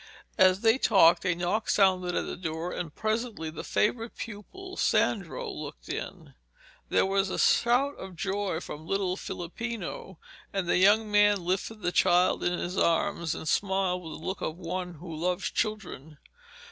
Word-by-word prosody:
As 185 +1 +5
they 225 +3 +4
talked 185 -9 +5
a 180 - +2
knock 180 +6 -1
sounded 185 -3 +3
at - - 0
the - - -5
door, 165 0 -4
and 165 -4 -5
presently 220 -7 -2
the 155 - -7
favourite 225 +2 0
pupil, 370 - -8
Sandro, 195 - 0
looked - - -8
in. - - -6 0.6
There - - +3
was 195 0 +1
a - - -3
shout 255 +4 +3
of 190 -1 -8
joy 195 -1 -2
from 155 -1 -8
little 195 -1 0
Filippino, 190 0 -6 0.3
and 195 -3 -2
the - - +3
young 210 +3 +4
man 205 -3 +4
lifted 200 +4 -2
the 175 - +1
child 180 +1 +3
in 175 0 +1
his 180 +2 -3
arms 170 -1 +1
and 160 - -7
smiled 190 0 +1
with 165 -2 -8
the - - -11
look 190 - -3
of 160 - -3
one 180 0 -4
who 165 +1 -8
loves 175 +3 -1
children. 180 - -3
185 Hz, 165 wpm, -28 LUFS, 175-210 Hz, 0.6 s, As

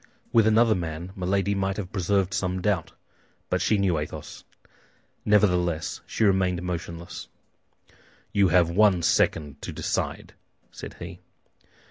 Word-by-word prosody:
With 115 -2 +5
another 110 +1 +5
man, 85 -1 -4
Milady 100 +1 0
might 95 -1 -1
have 95 -4 -5
preserved 95 0 +1
some 90 -1 -1
doubt; 95 -3 -1 0.6
but - - +1
she 105 - +2
knew 95 -5 +1
Athos. 75 - -7 0.8
Nevertheless, 90 -6 +2
she - - -1
remained 95 -3 +2
motionless. 85 -1 -6 1.0
"You 100 -1 +4
have 85 -1 +3
one 95 -2 +4
second 75 -3 +1
to - - -5
decide," - - -3 0.4
said - - -9
he. 90 +1 -9
95 Hz, 125 wpm, -26 LUFS, 85-100 Hz, 1.0 s, With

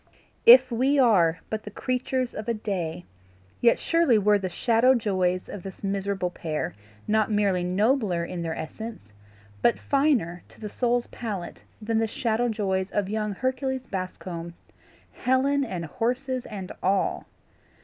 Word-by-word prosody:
If 480 - +9
we 260 +5 +2
are 185 -10 +4
but 220 0 -2
the 210 - -8
creatures 255 +3 -2
of 215 - -6
a 230 - +1
day, 180 -5 -3 0.5
yet 235 -1 +4
surely 330 -9 +3
were 210 0 +3
the 190 -1 -3
shadow 235 +7 +3
joys 185 -5 0
of 205 - -7
this 190 +1 -10
miserable 195 -2 -1
pair 155 -3 -3 0.3
not 215 0 +2
merely 200 -4 +1
nobler 195 -1 +1
in 175 0 -5
their 165 -1 -3
essence, 160 - -7 0.5
but 235 - +3
finer 265 - +1
to - - -19
the 210 - -6
soul's 245 -1 +1
palate 205 -7 -6 0.2
than 225 0 0
the 225 - +1
shadow 235 +2 0
joys 195 -3 -1
of 200 -2 -1
young 210 -1 -1
Hercules 260 +2 -2
Bascombe 180 -2 -6 0.6
Helen 275 +2 +1
and 180 -9 -4
horses 250 - -2
and 195 -3 -7
all! 195 +1 0
210 Hz, 150 wpm, -26 LUFS, 185-245 Hz, 0.6 s, If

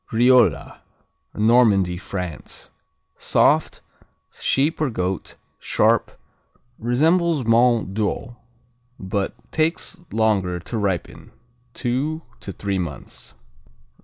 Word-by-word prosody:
Riola 115 - +3 0.6
Normandy, 105 -5 +3
France 90 -4 -7 0.5
Soft; - - +2 0.5
sheep 150 +4 0
or 150 - +1
goat; 95 -5 -3 0.2
sharp; - - +1 0.6
resembles 155 +5 +2
Mont 115 -3 +3
d'Or 110 +3 -2 0.6
but 95 +1 -3 0.2
takes 165 +4 -1
longer 100 -5 +1
to 110 +7 -6
ripen, 95 -4 -3 0.5
two 140 +6 -2 0.2
to 100 - -7
three 100 0 -3
months. 70 -6 -7
110 Hz, 85 wpm, -22 LUFS, 95-125 Hz, 0.6 s, Riola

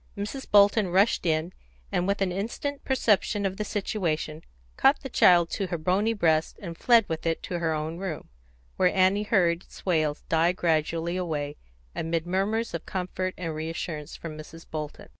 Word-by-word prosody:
Mrs. 210 +7 -5
Bolton 205 0 +5
rushed 190 +1 +2
in, 160 +3 0 0.4
and 180 - 0
with 200 0 +1
an 185 - -1
instant 235 +9 -4
perception 210 -5 +1
of 190 0 -2
the 210 - -1
situation, 165 -7 -2 0.3
caught 275 +2 +4
the 270 - -6
child 175 -7 +5
to 195 - -2
her 175 - -2
bony 190 +7 +1
breast, 160 -6 +1
and 170 -4 -7
fled 230 +2 +4
with 160 0 -3
it 165 - -1
to 175 - -3
her 165 -1 0
own 155 +2 -3
room, 185 -5 -5 0.5
where 185 - +4
Annie 190 +2 +3
heard 180 -5 +2
its - - -15
wails 155 -5 +1
die 165 +2 +3
gradually 165 0 0
away 150 -5 -3 0.4
amid 165 0 -2
murmurs 200 +6 -1
of 170 - -5
comfort 185 0 -3
and 165 -3 -4
reassurance 155 -1 -5
from 160 -2 -7
Mrs. 165 +2 -11
Bolton. 150 -1 -6
180 Hz, 175 wpm, -27 LUFS, 160-200 Hz, 0.5 s, Bolton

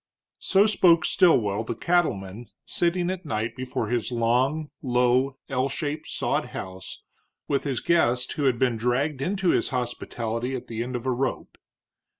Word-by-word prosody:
So 195 +2 +4
spoke 175 -6 +4
Stilwell, 110 - +3
the 115 - -4
cattleman, 115 - 0 0.2
sitting 175 +1 0
at 185 0 -5
night 115 -5 -3
before 125 -4 -3
his 120 0 -1
long, 125 +6 +1
low, 125 +1 +2
L 130 0 0
shaped 150 +1 -4
sod - - -1
house 95 0 -8 0.4
with 140 0 0
his 135 -5 -1
guest 125 -7 +2
who 145 - -2
had 130 -3 +3
been 125 -2 +1
dragged 130 +5 0
into 190 +4 0
his - - +2
hospitality 120 -1 -3
at 125 -1 -6
the 115 -2 -5
end 125 +1 -4
of 120 +1 -4
a 130 - +1
rope. 130 +1 -2
130 Hz, 155 wpm, -25 LUFS, 115-155 Hz, 0.4 s, So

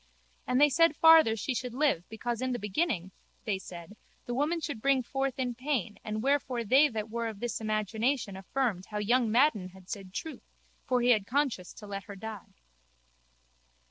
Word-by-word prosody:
And 250 +1 +2
they 295 - +7
said 330 +2 +3
farther 320 -8 +7
she 225 +4 -2
should 250 -1 -4
live 270 - +1
because 235 +2 -4
in 255 0 -1
the - - -1
beginning, 210 - -1 0.3
they 205 -4 -1
said, 175 +1 -10 0.3
the 245 - -4
woman 300 +7 0
should 290 -8 -5
bring 275 0 +3
forth 270 +1 -2
in 250 -2 -1
pain 250 -5 -2
and 215 +1 -3
wherefore 265 -3 +1
they 270 +7 +5
that 220 -1 -5
were 235 0 -2
of 215 -3 -6
this 240 0 -3
imagination 215 +1 -1
affirmed 195 -1 -2
how 210 - -5
young 230 +2 +2
Madden 230 -7 +3
had 185 0 -14
said 195 -3 -6
truth 310 +11 -7 0.3
for 250 -1 +2
he 245 - +2
had 210 -4 +2
conscience 260 -9 -1
to 210 - -11
let 200 -1 -6
her 200 - -9
die. 215 0 -9
235 Hz, 185 wpm, -30 LUFS, 210-270 Hz, 0.3 s, they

